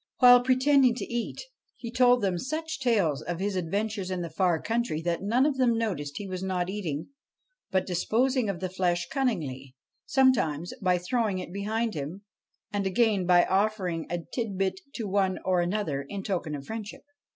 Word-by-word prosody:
While 245 -1 +8
pretending 260 0 +4
to - - -4
eat, 240 -1 -3 0.4
he 235 -2 -7
told 245 -1 +4
them 185 -3 0
such 315 - -4
tales 200 - +1
of 175 -1 -4
his 200 0 -1
adventures 195 +2 -2
in 185 -2 -2
the 170 - -6
far 175 -1 +2
country 230 -7 -1
that 170 0 -1
none 235 +7 +2
of 290 -3 +1
them 240 -3 +3
noticed 155 -11 -2
he 205 - -5
was 185 -1 -5
not 185 -1 -1
eating, 165 -8 -4 0.6
but 190 -1 +1
disposing 230 +6 +1
of 185 -3 -3
the 185 - -2
flesh 175 -2 0
cunningly, 150 - -2 0.3
sometimes 180 - +2
by 180 -2 +3
throwing 210 +2 0
it 180 -1 -6
behind 220 +3 -1
him, 155 +7 -6 0.5
and 200 -1 -1
again 205 -2 +2
by 175 -1 +6
offering 190 -4 0
a 175 - -1 0.2
tit 225 -6 -2
bit 190 0 0 0.2
to 225 -4 -3
one 190 -1 +1
or 185 -1 +2
another 175 -6 -1
in 195 +8 -6
token 175 -7 -2
of 140 -1 -8
friendship. 220 +1 -7
195 Hz, 180 wpm, -27 LUFS, 175-230 Hz, 0.6 s, While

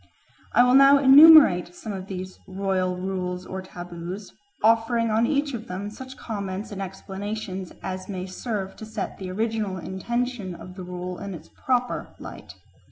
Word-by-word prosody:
I 245 - +6
will 250 0 +4
now 275 +1 +8
enumerate 275 - +8
some 215 - -6
of 190 -1 -6
these 185 -1 -7
royal 185 -1 -1
rules 180 -1 -3
or 190 0 -5
taboos, 175 +1 -8 0.3
offering 230 +1 +3
on 225 +2 +2
each 285 -1 0
of 230 -2 -6
them 195 +3 -5
such 260 +4 -10
comments 200 0 -5
and 195 -1 -5
explanations 195 0 -6
as 185 0 -5
may 185 -2 -4
serve 195 0 -4
to 220 - -8
set 215 -2 -5
the 190 -1 -5
original 215 -1 -2
intention 205 +2 -3
of 180 - -10
the 185 0 -8
rule 180 0 -6
in 200 -2 -6
its 165 - -12
proper 250 -1 -2
light. - - -10
195 Hz, 165 wpm, -25 LUFS, 185-230 Hz, 0.3 s, now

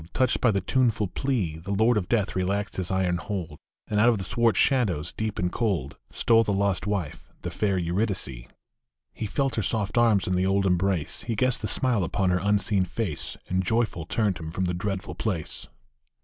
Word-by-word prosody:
Touched 125 -5 +1
by 125 - +4
the 100 -3 +1
tuneful 115 0 +1
pie 100 - -1
The 100 +2 -2
Lord 115 +3 +4
of 95 -4 -1
Death 105 -4 +1
relaxed 100 +2 -1
his 95 -2 -2
iron 95 -2 +1
hold, 85 -5 -5 0.3
Arid 105 -1 0
out 120 - +6
of 115 - +2
the 95 - -4
swart 115 +4 +2
shadows, 95 - +2
deep 110 -1 -3
and 90 -3 0
cold, 95 - -1 0.2
Stole 115 -1 +4
the 105 - -1
lost 100 -1 0
wife, 95 -8 -3
the - - -3
fair 100 -3 0
Eurydice. 90 - -1 0.7
He 110 - -4
felt 135 +4 0
her - - +2
soft 110 +2 0
arms 110 -5 +4
in 95 - -1
the 90 +1 +1
old 95 0 +2
embrace, 90 -3 +1
He 115 - -1
guessed 130 +4 +1
the - - -2
smile 125 -7 +2
upon 95 +2 0
her 90 - +2
unseen 100 -1 +2
face, 95 -3 -4
And 95 +1 0
joyful 110 -5 0
turned 100 -5 0
him 80 -1 -6
from 95 +3 -2
the 90 - -1
dreadful 95 +1 -3
place. 95 -8 -3
100 Hz, 200 wpm, -26 LUFS, 90-110 Hz, 0.7 s, out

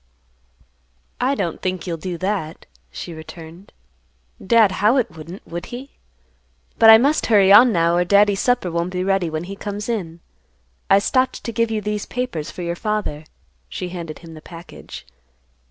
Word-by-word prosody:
"I 265 +3 +1
don't 170 - -3
think 185 -1 -3
you'll 170 -3 -3
do 175 +1 -5
that," 185 -4 -3 0.2
she 170 - -8
returned. 165 +3 -11 0.7
"Dad 220 -1 +4
Howitt 220 -4 +2
wouldn't, 165 +5 -10
would 170 +1 -7
he? 260 +3 -9 0.9
But 225 - +8
I 220 - +11
must 280 +6 +1
hurry 200 -4 +5
on 240 +4 +8
now, 170 -3 +2
or 175 - +3
Daddy's 200 +2 +3
supper 245 -8 +1
won't 170 +2 -2
be 180 0 -1
ready 195 -3 +1
when 155 +1 -4
he 195 +3 -7
comes 205 +1 -6
in. 180 -8 -4 0.7
I 195 - +6
stopped 255 +6 0
to 230 - -4
give 230 0 0
you 220 -1 -2
these 210 0 -3
papers 245 -12 -4
for 180 - -7
your 170 0 -2
father." 210 -7 -3 0.4
She 180 - -5
handed 170 -3 -7
him 165 - -11
the 155 - -11
package. 170 - -11
190 Hz, 170 wpm, -21 LUFS, 170-220 Hz, 0.9 s, I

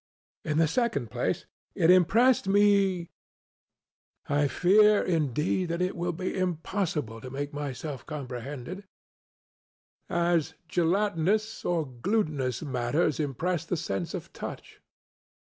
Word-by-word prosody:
In 155 0 -1
the 165 0 +4
second 150 - -1
place, - - -1 0.3
it 165 - +5
impressed 200 +6 +4
me 195 -3 +3 1.2
(I 145 0 +2
fear, 210 +7 +5
indeed, 160 +2 0
that 170 +1 -2
it 180 +1 0
will 175 +1 -1
be 185 +2 -4
impossible 165 - -2
to 130 - -7
make 140 +3 -4
myself 145 -1 -5
comprehended) 140 - -6 1.2
as 170 -2 +1
gelatinous 200 +5 +1
or 170 -3 0
glutinous 135 - -1
matters 140 +3 0
impress 155 +4 -1
the 170 +1 -2
sense 95 - -3
of - - -8
touch. - - -8
165 Hz, 110 wpm, -28 LUFS, 145-185 Hz, 1.2 s, it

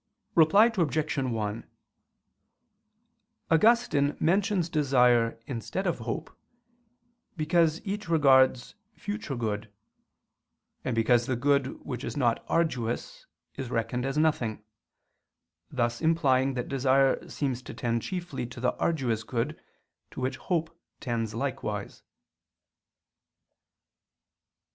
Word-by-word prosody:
Reply 200 +9 +6
Obj. 155 -4 0
1: 115 -4 -3 1.8
Augustine 165 -6 +3
mentions 190 +1 +2
desire 125 -7 +3
instead 140 +9 -4
of 175 - 0
hope, - - -5 1.0
because 160 0 +2
each 205 -1 -4
regards 130 -5 +4 0.2
future 205 -9 -5
good; 105 -2 -3 1.1
and 125 - -2
because 120 +1 +3
the 130 - 0
good 140 +1 0
which 125 -2 -5
is - - -5
not 120 -4 +1
arduous 165 - -1 0.3
is 130 -3 -6
reckoned 115 +1 -1
as 135 +2 -2
nothing: 125 -9 0 1.1
thus 120 0 -1
implying 135 -5 +2
that 125 - -3
desire 135 0 +2
seems 130 -4 -2
to - - -9
tend 115 -1 -1
chiefly 175 -8 -4
to 125 0 -10
the 125 0 +1
arduous 125 -9 0
good, 125 +7 -3 0.5
to - - -9
which 130 +1 -2
hope 165 -2 -2 0.2
tends 115 -4 -3
likewise. 110 -6 -4
135 Hz, 105 wpm, -28 LUFS, 120-160 Hz, 1.8 s, Reply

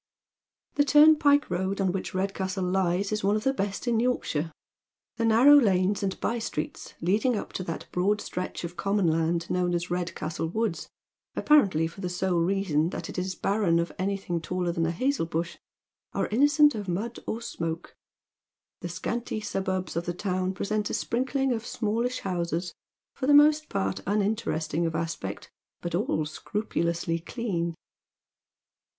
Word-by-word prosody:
Tiie 285 - +4 0.3
timi - - -14
pike 290 -1 +4
road 190 +3 -1
on 190 -2 +2
which 190 0 -4
Redcastle 190 0 -1
lies 185 +1 +1
is 215 -1 -1
one 200 +2 +3
of 215 - -1
the 270 - +2
best 200 -1 -3
in 235 -2 +2
Yorkshire; 170 -10 0 0.7
the 230 - -1
naiTow 250 +6 +7
lanes 195 -2 +2
and 195 -1 -2
by 235 - -1
streets 155 -9 -5
leading 210 +7 +2
up - - -6
to 185 - -3
that 165 - -5
broad 200 +4 +1
stretch 180 -2 -5
of 170 0 -5
common 195 0 +1
land 165 +1 +1
known 180 -1 +1
as 175 +1 -3
Redcastle 170 -2 -2
Woods, 200 -2 -2 0.5
apparently 200 - +4
for 170 +4 -7
the 180 - -2
sole 180 0 0
reason 170 -3 +1
that - - -6
it - - -4
is 185 0 -3
barren 195 -5 +1
of 170 0 0
anything 190 -3 -1
taller 180 +1 -1
than 165 -1 0
a - - 0
hazel 255 - 0
bush, 170 +1 -3 0.6
are - - 0
innocent 290 +5 +5
of 205 -3 -5
mud 205 +7 -3
or 225 - -2
smoke. 165 -8 -5 0.8
The 175 - -5
scanty 220 +6 -3
suburbs 190 -4 -2
of 170 +1 -2
the 175 - -2
town 185 0 -1
present 210 +2 -1
a - - -1
sprinkling 265 +2 0
of 225 -2 -1
smallish 235 +2 -1
houses, 175 -1 -2 0.4
for 260 - -3
the 290 - +6
most 300 +1 +5
part 95 0 -1
unin 205 +1 +2
teresting 165 -5 -1
of 165 - -3
aspect, 160 -12 -4 0.3
but 175 - -5
all 170 -4 0
scrupulously 170 0 -2
clean. 170 -4 -3
190 Hz, 165 wpm, -27 LUFS, 170-220 Hz, 0.8 s, naiTow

